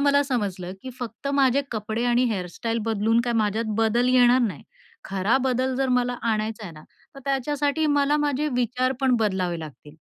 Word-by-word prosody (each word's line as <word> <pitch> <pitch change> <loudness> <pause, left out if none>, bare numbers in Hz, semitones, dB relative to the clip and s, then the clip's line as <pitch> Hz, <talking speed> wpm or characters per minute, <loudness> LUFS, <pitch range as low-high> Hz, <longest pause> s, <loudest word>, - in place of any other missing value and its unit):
मला 285 0 +4
समजलं 200 -9 -3
की 260 - -6
फक्त 245 +3 -6
माझे 275 0 +3
कपडे 220 +1 -3
आणि 245 +1 +3
हेअरस्टाईल 215 +4 -3
बदलून 225 +1 +2
काय 240 - 0
माझ्यात 220 0 0
बदल 225 +2 +2
येणार 250 0 +5
नाही. 225 -6 -2 0.4
खरा 195 +5 +1
बदल 260 0 0
जर 270 0 0
मला 250 -1 +1 0.2
आणायचा 215 0 -2
आहे 175 - -8
ना, 155 -1 -13 0.3
तर 275 - -11
त्याच्यासाठी 290 +3 0
मला 285 +1 +3
माझे 290 +1 0
विचार 250 +2 0
पण 265 -2 +3
बदलावे 185 -5 0
लागतील. 150 -1 -11
240 Hz, 175 wpm, -24 LUFS, 215-265 Hz, 0.4 s, येणार